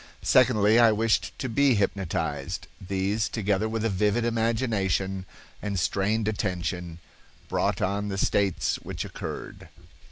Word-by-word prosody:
Secondly, 115 -3 +5
I 115 -2 +7
wished 110 0 +1
to 130 - -3
be 135 +1 +3
hypnotized. 95 -8 -2 0.2
These, 100 +3 -1
together 105 0 0
with 115 0 -2
a - - +2
vivid 105 +4 +1
imagination 110 -5 0 0.3
and 100 -2 -2
strained 100 +7 0
attention, 90 -5 -2 0.5
brought - - 0
on 100 +2 -1
the 95 -1 -3
states 100 -1 +1
which - - -6
occurred." - - -7
105 Hz, 125 wpm, -26 LUFS, 95-115 Hz, 0.5 s, I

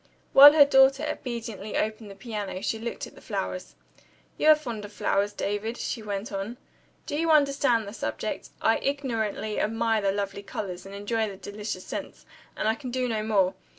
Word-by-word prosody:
While 285 +2 +11
her 295 -2 +8
daughter 270 +1 +5
obediently 230 -6 -5
opened 215 0 -2
the 195 - -10
piano, 205 -2 -5
she 220 - -1
looked 235 +1 -5
at - - -13
the - - -15
flowers. - - -4 0.6
"You - - 0
are 310 - +9
fond 240 -8 -6
of 205 - -9
flowers, 205 0 0
David?" 205 +4 -3
she 235 - -3
went 205 0 -4
on. 200 +4 -4 0.5
"Do - - -4
you 330 +2 0
understand 275 -7 +3
the 200 - -7
subject? - - -4
I - - +4
ignorantly 225 -6 -2
admire 225 0 +1
the 195 -1 +2
lovely 200 0 -3
colors, 195 -2 -6
and 195 - -9
enjoy 220 +2 -1
the 195 - -9
delicious 205 -1 -6
scents - - -7 0.3
and - - -1
I 220 - +4
can 255 +2 -7
do 255 0 -1
no 220 -3 -1
more. 200 -4 +2
220 Hz, 185 wpm, -27 LUFS, 205-250 Hz, 0.6 s, While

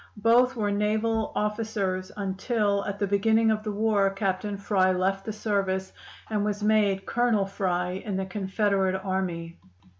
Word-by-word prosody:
Both 240 +4 +4
were 210 -3 0
naval 215 +2 0
officers, 210 -3 -2
until 200 +1 0
at 200 0 -3
the 200 - 0
beginning 220 +3 +3
of 215 0 0
the 215 0 -3
war 205 -1 +2
Captain 195 +1 -2
Fry 195 -2 +2
left 190 +1 0
the 220 - -3
service, 195 -3 -1 0.3
and 210 -2 -1
was 210 0 -2
made 205 -2 +2
Colonel 235 -4 +1
Fry 185 -1 -2
in 200 -4 -3
the 190 - -2
Confederate 195 0 0
Army. 180 -3 -3
200 Hz, 150 wpm, -26 LUFS, 190-215 Hz, 0.3 s, Both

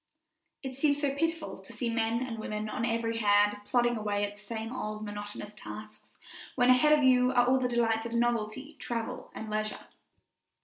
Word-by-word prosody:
It 265 -1 -5
seems 285 +1 +2
so 285 -2 0
pitiful 330 - -2
to 190 - -13
see 245 - -2
men 230 +1 0
and 230 -3 -5
women 215 0 -3
on 230 +2 -1
every 230 0 0
hand 205 -1 +4
plodding 240 0 +2
away 205 -1 -1
at 205 0 -8
the - - -17
same 225 +3 -5
old, 215 -3 -4
monotonous 205 0 -6
tasks, 215 0 -10 0.4
when 250 0 +5
ahead 300 +4 +6
of 290 - +1
you 250 -1 +5
are 245 -1 +5
all 260 +1 +4
the 255 - +1
delights 230 -2 +1
of 235 - -7
novelty, 240 +4 -1
travel, 230 -2 -4
and 220 - -6
leisure. 215 0 -3
230 Hz, 185 wpm, -30 LUFS, 215-255 Hz, 0.4 s, ahead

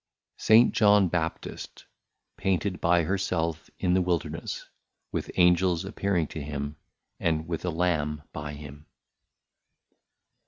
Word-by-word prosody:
St. 115 +2 +6
John 105 -3 +5
Baptist 80 -1 -4 0.5
Painted 95 0 -1
by 85 0 +4
her 95 +4 0
self 85 -3 -2
in 90 - +1
the 95 - +3
Wilderness, 90 -2 -2 0.4
with - - -3
Angels 90 0 +3
appearing 95 -4 0
to 80 - -6
him, 70 0 -4 0.4
and 80 -1 0
with 85 -2 -3
a - - 0
Lamb 80 -3 0
by 75 0 -5
him. 75 0 -11
85 Hz, 120 wpm, -27 LUFS, 75-95 Hz, 0.5 s, St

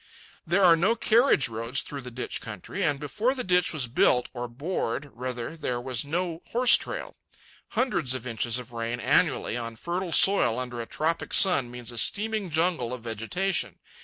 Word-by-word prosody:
There 185 +4 +3
are 170 -2 +8
no 195 +8 +2
carriage 235 - +3
roads 115 +3 -3
through 140 -1 -7
the 125 - -8
ditch 125 +1 -5
country, 110 - -6
and 145 -6 +1
before 215 - -1
the 255 - -3
ditch 180 -1 +2
was 155 -6 -1
built, 125 +1 +2
or 120 -1 -4
bored, 140 0 -3
rather, 125 +3 -5
there 125 -6 -2
was 125 -1 -2
no 165 +3 -3
horse 245 +1 +5
trail. - - -4 0.6
Hundreds 235 - +1
of 130 -1 -6
inches 120 0 -1
of 125 -1 -8
rain 115 +1 -3
annually, 110 - +2
on 115 -1 -4
fertile 175 +7 -3
soil, 160 - +4
under 125 -2 -4
a 115 - -7
tropic 160 +2 -1
sun, 180 -11 +4
means 120 -1 -7
a 120 - -2
steaming 210 - +1
jungle 160 -7 0
of 120 - -12
vegetation. 120 - -2
135 Hz, 180 wpm, -27 LUFS, 120-180 Hz, 0.6 s, are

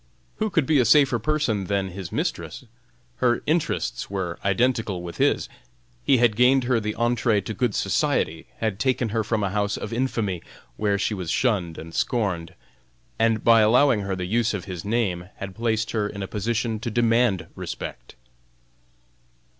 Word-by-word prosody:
Who 215 0 0
could 160 -6 +1
be 150 0 +3
a - - +5
safer 135 -2 +4
person 115 -6 0
than 100 -1 -1
his 95 -1 -7
mistress? - - -3 0.5
Her 120 -1 +1
interests 160 +1 -1
were 95 -3 -3
identical 100 -2 +1
with 85 -1 -7
his; - - +2 0.6
he 135 - +4
had 120 -3 +3
gained 125 +3 +4
her 120 -1 +2
the 105 -1 -3
entrée 120 -3 +1
to 110 - -3
good 120 -3 0
society; 80 0 0
had 110 -3 -2
taken 130 -2 +1
her 110 +1 0
from 110 -1 -1
a 95 - -1
house 100 0 0
of - - -5
infamy, 115 -8 -1 0.3
where 100 +3 +1
she 100 - -1
was 90 -5 -4
shunned 90 -8 0
and 80 +1 -9
scorned, 95 -9 -1 0.6
and 115 -1 +2
by 115 -1 +6
allowing 120 +2 +4
her 100 -1 -2
the 90 -1 -4
use 115 +3 +1
of 95 - -5
his 90 -4 -6
name, 100 -5 -1
had 95 -1 -7
placed 115 +1 -1
her 105 -2 -1
in 100 -1 -6
a - - -4
position 110 +2 -2
to 120 - -3
demand 115 -3 +2
respect. - - -7
110 Hz, 170 wpm, -24 LUFS, 95-120 Hz, 0.6 s, by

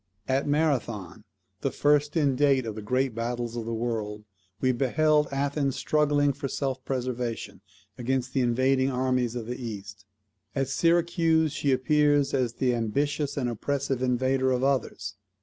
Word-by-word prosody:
At 135 +2 +1
Marathon, 135 - -1 0.3
the - - 0
first 145 +2 +2
in 140 -4 +2
date 135 -2 +3
of 110 - -3
the 110 - -7
Great 130 +4 0
Battles 120 +1 -3
of 115 -2 -4
the 115 - -2
World, 110 -2 -3 0.3
we 130 - +2
beheld 150 +4 +2
Athens 140 0 0
struggling 145 -2 +2
for 135 - -4
self 135 -1 -3
preservation 125 -3 -3 0.4
against 130 +1 -1
the 135 - +2
invading 130 +2 +2
armies 125 -2 0
of 120 -2 -4
the 125 +2 -5
East. 100 -3 -7 0.5
At 135 -1 0
Syracuse 165 0 +2
she 140 - 0
appears 145 +1 +3
as 125 -4 +1
the 125 -2 +1
ambitious 140 +6 -1
and 130 -3 0
oppressive 135 +2 -2
invader 130 +1 +1
of 125 0 0
others. 110 -7 -1
130 Hz, 150 wpm, -27 LUFS, 120-145 Hz, 0.5 s, date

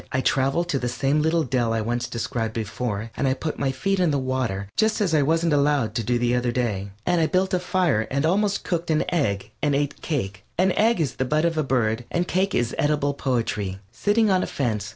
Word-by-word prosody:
I 130 - +1
traveled 135 +6 +1
to 140 - +1
the 125 - -2
same 135 +4 +1
little 160 +1 +2
dell 120 -4 0
I 115 +1 -1
described 115 -2 -3
before, 110 0 -3
and 140 - 0
I 130 - +2
put 155 +2 -4
my 135 -1 +1
feet 195 +9 -1
in 180 -2 +3
the 145 - +1
water 130 -7 -2
just 220 0 +2
as 195 -6 +1
I 155 - +4
wasn't 165 +2 +2
allowed 140 -6 +2
to 115 0 -1
do 120 +3 +1
the 120 0 +1
other 125 0 0
day. 105 -6 -2 0.2
And 175 -1 +2
I 160 - +3
built 190 +2 +1
a 185 - +3
fire 175 -11 +1
and 140 +3 0
almost 200 +4 +1
cooked 170 -1 -2
an 155 -1 +2
egg 105 - 0
and 145 -2 +2
ate 145 0 -1
cake 105 -11 -3
(an 185 +2 +3
egg 220 +1 +2
is 145 -7 -1
the 130 - 0
bud 150 +5 +1
of 170 -1 +1
a 155 - +1
bird, 120 -3 0
and 175 +1 -1
cake 190 +2 0
is 120 -1 0
edible 145 -1 +1
poetry) 115 -8 -2
sitting 205 - +2
on 185 -1 +3
a - - -2
fence. 110 -6 -2
135 Hz, 235 wpm, -24 LUFS, 120-165 Hz, 0.2 s, I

